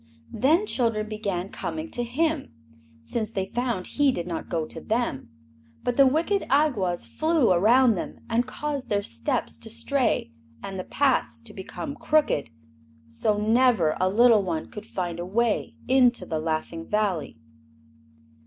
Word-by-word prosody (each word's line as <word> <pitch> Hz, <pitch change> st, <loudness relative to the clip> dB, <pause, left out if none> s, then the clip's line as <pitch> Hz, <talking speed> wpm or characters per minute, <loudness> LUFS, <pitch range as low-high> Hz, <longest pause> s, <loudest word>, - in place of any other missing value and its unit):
Then 300 Hz, -, +3 dB
children 230 Hz, -, 0 dB
began 200 Hz, -4 st, -3 dB
coming 315 Hz, +8 st, -5 dB
to 245 Hz, -, -1 dB
him, 295 Hz, +5 st, -1 dB, 0.5 s
since 215 Hz, -, -2 dB
they 195 Hz, -4 st, -2 dB
found 240 Hz, -2 st, -2 dB
he 290 Hz, -2 st, +2 dB
did 175 Hz, -9 st, -3 dB
not 170 Hz, -2 st, -5 dB
go 165 Hz, -3 st, -1 dB
to -, -, -8 dB
them; 220 Hz, -, -2 dB, 0.5 s
but 245 Hz, -, 0 dB
the 275 Hz, 0 st, +6 dB
wicked 335 Hz, +9 st, +1 dB
Awgwas 250 Hz, -, +2 dB
flew 315 Hz, -, +2 dB
around 230 Hz, +7 st, +5 dB
them 180 Hz, -, -6 dB
and 235 Hz, +2 st, +1 dB
caused 285 Hz, -3 st, -4 dB
their 205 Hz, -1 st, +1 dB
steps 115 Hz, -5 st, -2 dB
to 225 Hz, -, -8 dB
stray 235 Hz, -, 0 dB, 0.3 s
and 195 Hz, -1 st, -5 dB
the -, -, -3 dB
paths 275 Hz, +1 st, +1 dB
to 230 Hz, -2 st, -11 dB
become 205 Hz, +9 st, -6 dB
crooked, 295 Hz, -, +1 dB, 0.6 s
so 205 Hz, -, 0 dB
never 220 Hz, -6 st, +3 dB
a 185 Hz, -, +3 dB
little 225 Hz, +1 st, +5 dB
one 170 Hz, -4 st, -3 dB
could 210 Hz, +1 st, -9 dB
find 175 Hz, -4 st, -4 dB
a -, -, -2 dB
way 230 Hz, +3 st, 0 dB
into 250 Hz, -6 st, +4 dB
the 160 Hz, -3 st, -2 dB
Laughing 160 Hz, +1 st, -3 dB
Valley. 200 Hz, -, -1 dB
225 Hz, 155 wpm, -25 LUFS, 185-260 Hz, 0.6 s, the